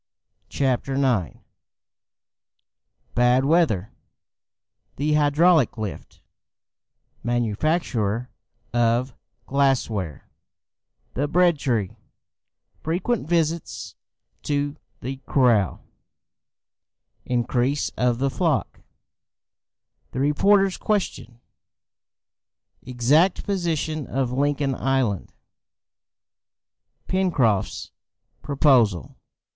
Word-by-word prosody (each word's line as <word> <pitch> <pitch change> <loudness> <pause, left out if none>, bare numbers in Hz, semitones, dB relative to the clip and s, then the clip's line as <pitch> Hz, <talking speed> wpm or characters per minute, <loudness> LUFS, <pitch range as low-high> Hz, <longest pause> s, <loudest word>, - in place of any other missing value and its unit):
CHAPTER 135 0 -1
IX 125 - 0 1.7
Bad 125 +2 +3
Weather 140 - +2 1.0
The 150 +2 0
Hydraulic 150 -1 +3
Lift 105 -3 -7 1.0
Manufacture 120 - -1 0.4
of 120 +2 +1 0.3
Glass 135 -3 +1
ware 90 -9 -5 0.9
The 145 +3 -1
Bread 175 0 +3
tree 110 -6 -1 0.8
Frequent 180 +4 -2
Visits 165 - -1 0.5
to 145 0 -1 0.3
the 130 +2 -5
Corral 120 -8 +2 1.4
Increase 125 +3 0
of 125 -1 +1
the 135 +2 0
Flock 160 -3 -1 1.3
The 125 - -3
Reporter's 195 +7 +3
Question 185 - -2 1.4
Exact 135 +9 +2
Position 160 - -2
of 130 -2 -1
Lincoln 140 +1 0
Island 130 -7 -1 1.8
Pencroft's 140 - 0 0.5
Proposal. 125 - +2
135 Hz, 65 wpm, -23 LUFS, 120-155 Hz, 1.8 s, Bad